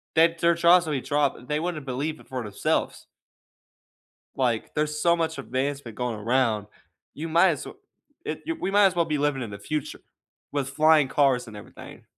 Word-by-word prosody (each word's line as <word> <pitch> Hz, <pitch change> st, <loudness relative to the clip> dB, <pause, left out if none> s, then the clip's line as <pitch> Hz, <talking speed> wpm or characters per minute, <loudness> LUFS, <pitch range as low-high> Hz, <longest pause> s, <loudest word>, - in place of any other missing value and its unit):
that 165 Hz, +1 st, +4 dB
their 170 Hz, 0 st, +3 dB
jaws 170 Hz, +1 st, +5 dB
will 155 Hz, -, -2 dB
be 135 Hz, -, -1 dB
dropped, 145 Hz, 0 st, 0 dB
uh, 125 Hz, -, -15 dB
they 150 Hz, +1 st, 0 dB
wouldn't 165 Hz, -4 st, -4 dB
believe 140 Hz, +5 st, -3 dB
it -, -, -17 dB
for 130 Hz, -2 st, -4 dB
themselves. 105 Hz, -2 st, -2 dB, 1.3 s
Like, 120 Hz, -4 st, -1 dB
there's 150 Hz, 0 st, -1 dB
so 170 Hz, +1 st, +4 dB
much 160 Hz, -2 st, -2 dB
advancement 135 Hz, -2 st, -3 dB
going 125 Hz, -2 st, -2 dB
around, 110 Hz, -1 st, 0 dB, 0.5 s
you 160 Hz, +3 st, -5 dB
might 170 Hz, +4 st, +5 dB
as 150 Hz, -, -4 dB
well -, -, -10 dB, 0.5 s
it -, -, -5 dB
you 330 Hz, -, -2 dB
We 315 Hz, -, -3 dB
might 205 Hz, 0 st, +5 dB
as 185 Hz, -, +1 dB
well 170 Hz, -1 st, +1 dB
be 155 Hz, -2 st, -1 dB
living 145 Hz, -2 st, 0 dB
in 115 Hz, -, -6 dB
the 100 Hz, -, -8 dB
future 150 Hz, +8 st, -4 dB, 0.5 s
with 140 Hz, -2 st, -1 dB
flying 150 Hz, 0 st, +4 dB
cars 135 Hz, -4 st, +2 dB
and 110 Hz, -, -10 dB
everything. 105 Hz, -, -12 dB
145 Hz, 195 wpm, -25 LUFS, 130-165 Hz, 1.3 s, jaws